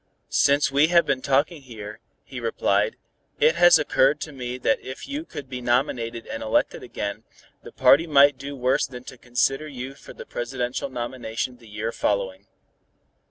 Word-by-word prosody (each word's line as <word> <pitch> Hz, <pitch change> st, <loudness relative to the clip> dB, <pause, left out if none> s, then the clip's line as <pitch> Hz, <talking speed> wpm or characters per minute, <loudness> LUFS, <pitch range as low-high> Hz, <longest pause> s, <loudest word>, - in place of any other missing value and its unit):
"Since 140 Hz, 0 st, +3 dB
we 145 Hz, +3 st, +4 dB
have 170 Hz, 0 st, +4 dB
been 135 Hz, -2 st, 0 dB
talking 145 Hz, +4 st, +1 dB
here," 110 Hz, -4 st, -9 dB, 0.2 s
he 130 Hz, -, -8 dB
replied, 105 Hz, -3 st, 0 dB, 0.4 s
"it 160 Hz, -, +5 dB
has 175 Hz, 0 st, +7 dB
occurred 140 Hz, -1 st, +2 dB
to 155 Hz, -, -5 dB
me 125 Hz, -2 st, -5 dB
that 130 Hz, -, +1 dB
if 130 Hz, -, -8 dB
you 285 Hz, +2 st, -4 dB
could 140 Hz, -, -8 dB
be 125 Hz, -1 st, -6 dB
nominated 120 Hz, -1 st, -1 dB
and 110 Hz, -, -6 dB
elected 110 Hz, -, 0 dB
again, 100 Hz, +2 st, -5 dB, 0.4 s
the -, -, -11 dB
party 135 Hz, +6 st, +5 dB
might 140 Hz, -3 st, +5 dB
do 140 Hz, +1 st, -6 dB
worse 130 Hz, 0 st, +1 dB
than 125 Hz, -1 st, -10 dB
to 125 Hz, -, -11 dB
consider 135 Hz, +4 st, 0 dB
you 135 Hz, -2 st, -7 dB
for 140 Hz, -, -13 dB
the -, -, -10 dB
presidential 125 Hz, +2 st, -3 dB
nomination 125 Hz, -1 st, -4 dB
the 115 Hz, -2 st, -17 dB
year 110 Hz, +2 st, -3 dB
following. 100 Hz, -2 st, -2 dB
130 Hz, 170 wpm, -24 LUFS, 115-140 Hz, 0.4 s, has